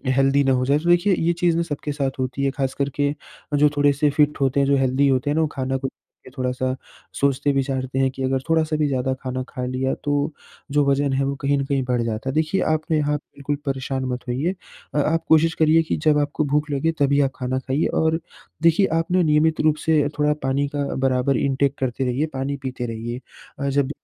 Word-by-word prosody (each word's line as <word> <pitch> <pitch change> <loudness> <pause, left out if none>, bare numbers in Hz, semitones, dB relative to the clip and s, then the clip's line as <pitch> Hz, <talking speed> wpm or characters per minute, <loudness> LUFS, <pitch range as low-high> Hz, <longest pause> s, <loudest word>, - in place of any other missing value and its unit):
Healthy 135 +1 +3
ना 135 - +2
हो 125 0 +1
जाएँ। 140 +3 +3
तो 170 +3 -2
देखिए 175 +3 +4
ये 170 +1 +1
चीज़ 170 -1 +2
न 170 - +1
सबके 150 -2 -4
साथ 135 -2 -3
होती 130 +1 -2
है 135 - +2
ख़ास 135 -1 -2
करके 140 +1 -1 0.4
जो 150 +1 +5
थोड़े 145 0 +4
से 145 +1 +2
फिट 150 +1 +2
होते 135 +1 +2
हैं, 140 - +2
जो 140 - +4
हेल्दी 135 +1 +2
होते 130 +1 +1
हैं 145 - +1
ना 160 - +2
वो 155 - +2
खाना 135 -1 -2
को 135 0 -3
लेके - - -17
थोड़ा-सा 130 0 -1 0.4
सोचते 140 +1 +2
विचारते 135 -1 -1
हैं 135 0 +3
कि 135 - -6
अगर 130 0 0
थोड़ा-सा 160 -1 +2
भी 150 -1 +1
ज़्यादा 130 -1 0
खाना 130 0 -3
खा 125 -2 -4
लिया 130 +1 -1
तो 145 +1 0 0.4
जो 145 -1 +3
वज़न 140 0 +1
है 135 +1 +1
वो 140 +1 -1
कहीं 140 0 +2
न 140 - -1
कहीं 135 -1 0
बढ़ 125 -1 0
जाता 115 +2 -3
है। - - -2
देखिए 160 +5 +1
आपने 155 0 0
यहाँ 150 0 +1
बिल्कुल 145 0 -5
परेशान 135 -1 -2
मत 125 0 -4
होइए। 140 +10 -1 0.4
अ, - - +1
आप 165 +3 +1
कोशिश 160 +1 +5
करिए 160 +1 +5
कि 160 - -2
जब 150 -1 +5
आपको 145 +1 -1
भूख 150 +1 +1
लगे 140 +4 +1
तभी 140 0 +3
आप 135 - +1
खाना 130 0 -2
खाइए 135 +4 0
और 160 0 +1 0.4
देखिए 165 +4 +5
आपने 180 +2 +1
नियमित 155 +1 +2
रूप 155 -1 +3
से 155 -3 +3
थोड़ा 150 0 +3
पानी 135 +2 +1
का 145 -1 0
बराबर 130 0 +1
इंटेक 140 0 +1
करते 130 0 -1
रहिए, 130 +4 0
पानी 135 +1 -2
पीते 130 -2 -4
रहिए। 115 +1 -5 0.4
अ, 140 - -1
जब 140 0 +1
140 Hz, 225 wpm, -22 LUFS, 130-150 Hz, 0.4 s, जो